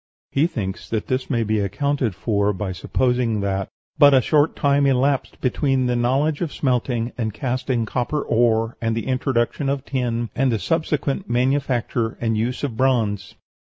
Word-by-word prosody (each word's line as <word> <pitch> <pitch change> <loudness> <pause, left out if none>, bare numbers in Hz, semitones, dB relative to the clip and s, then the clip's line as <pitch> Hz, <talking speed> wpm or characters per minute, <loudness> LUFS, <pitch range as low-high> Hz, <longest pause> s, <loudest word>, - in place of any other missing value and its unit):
He 145 +4 +3
thinks 100 - -5
that 110 -2 -2
this 130 0 -2
may 115 -4 +1
be 110 0 0
accounted 115 +3 -1
for 100 +1 0
by 95 0 -4
supposing 120 +3 0
that 95 -1 -2 0.3
"but 145 -2 +8
a - - +7
short 150 +5 +2
time 140 -1 +2
elapsed 135 +1 +1
between 130 0 +1
the 125 0 +1
knowledge 135 +6 +1
of 165 -4 -1
smelting 125 -3 -1
and 110 -2 -1
casting 125 -1 -1
copper 125 +6 -2
ore 115 -1 +2
and 115 -1 0
the 115 - -3
introduction 130 +1 0
of 140 0 -2
tin, 120 -3 -2
and 130 -1 +2
the 115 - +1
subsequent 150 - -1
manufacture 125 -2 0
and 115 -1 0
use 120 +5 -2
of 135 -6 -2
bronze." 110 -6 0
125 Hz, 165 wpm, -22 LUFS, 115-135 Hz, 0.3 s, but